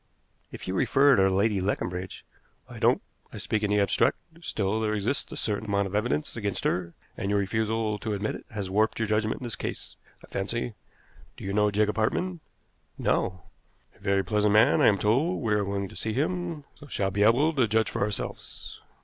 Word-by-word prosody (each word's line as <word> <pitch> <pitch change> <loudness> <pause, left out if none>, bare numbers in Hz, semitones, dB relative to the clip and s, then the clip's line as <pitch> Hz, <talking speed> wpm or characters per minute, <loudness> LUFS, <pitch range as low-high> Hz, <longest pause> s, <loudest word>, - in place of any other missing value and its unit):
"If - - -9
you 95 - -1
refer 135 +7 +4
to 95 -1 +4
Lady 100 +1 +2
Leconbridge 90 -1 -3 0.2
" - - -39
"I - - -10
don't. - - +3 0.3
I - - -8
speak 105 +2 -1
in 105 - 0
the 105 0 +3
abstract. 100 -2 +3 0.2
Still, 105 - -1
there 110 -1 0
exists 110 +7 -1
a - - -6
certain 105 0 -2
amount 100 0 +1
of 95 - -6
evidence 120 +8 0
against 105 -4 -3
her, 85 -2 -1 0.2
and 100 - -3
your 100 - +2
refusal 110 +1 0
to 110 -1 -2
admit 100 +2 -2
it - - -9
has 105 -4 -4
warped 105 +4 +1
your 115 - 0
judgment 110 +2 0
in - - -7
this 120 -3 -2
case, - - -6 0.3
I - - -24
fancy. 115 +4 -3 0.6
Do - - -10
you 95 - -3
know 105 0 +3
Jacob 105 +1 +1
Hartmann?" 175 +11 0 0.6
"No." 90 -2 0 0.5
"A - - -24
very 100 -1 +1
pleasant 105 -1 +2
man, 110 +1 +5
I - - +6
am 100 - +5
told. 135 - +1
We 110 -2 +1
are 105 -1 +2
going 100 0 -2
to - - -13
see 110 - -2
him, 170 +2 -2 0.2
so 145 - -12
shall 100 -7 -1
be 100 +2 -1
able 125 +10 +4
to 130 -6 +3
judge 110 0 +1
for - - -3
ourselves. 100 0 -4
105 Hz, 210 wpm, -27 LUFS, 100-115 Hz, 0.6 s, I